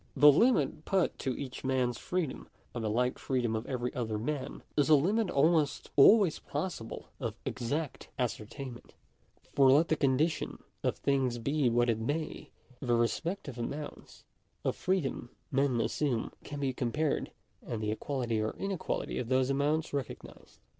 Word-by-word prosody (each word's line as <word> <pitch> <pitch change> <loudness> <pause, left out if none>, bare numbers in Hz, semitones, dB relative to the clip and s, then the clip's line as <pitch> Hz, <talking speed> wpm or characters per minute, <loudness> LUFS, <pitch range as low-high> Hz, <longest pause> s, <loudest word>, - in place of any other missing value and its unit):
The 145 0 +9
limit 155 - +3
put 190 0 +1
to 130 -2 -2
each 130 -3 -6
man's 130 -2 0
freedom, 180 -6 -3 0.2
by 120 - -3
the 110 -2 -1
like 125 +4 0
freedom 120 -4 0
of 110 +2 -3
every 125 -2 -2
other 110 -3 -2
man, 135 +4 -4
is 145 +1 +3
a 155 - +9
limit 195 +8 +2
almost 150 0 +2
always 185 +4 +6
possible 145 -7 -5
of - - -3
exact 140 +4 -3
ascertainment; 125 +1 -5 0.6
for 135 -1 +6
let 150 +5 +5
the 160 - +3
con 135 -3 +2
dition 155 +2 0 0.2
of - - 0
things 130 -3 +1
be 140 +3 +1
what 120 +1 +3
it 115 -2 +1
may, 145 +8 -3 0.3
the 120 -3 +1
respective 135 +3 -1
amounts 145 +5 -6 0.4
of - - +1
freedom 165 -10 -1 0.2
men 135 -3 +2
assume 125 -1 0
can 145 -1 -6
be 135 -2 0
compared, 140 +5 -1 0.3
and 115 - -4
the 105 - 0
equality 120 -1 -1
or 110 - -2
inequality 195 -3 -2
of 120 - -4
those 130 0 +3
amounts 150 +3 0
recognised. 140 -4 -6
135 Hz, 155 wpm, -31 LUFS, 120-150 Hz, 0.6 s, The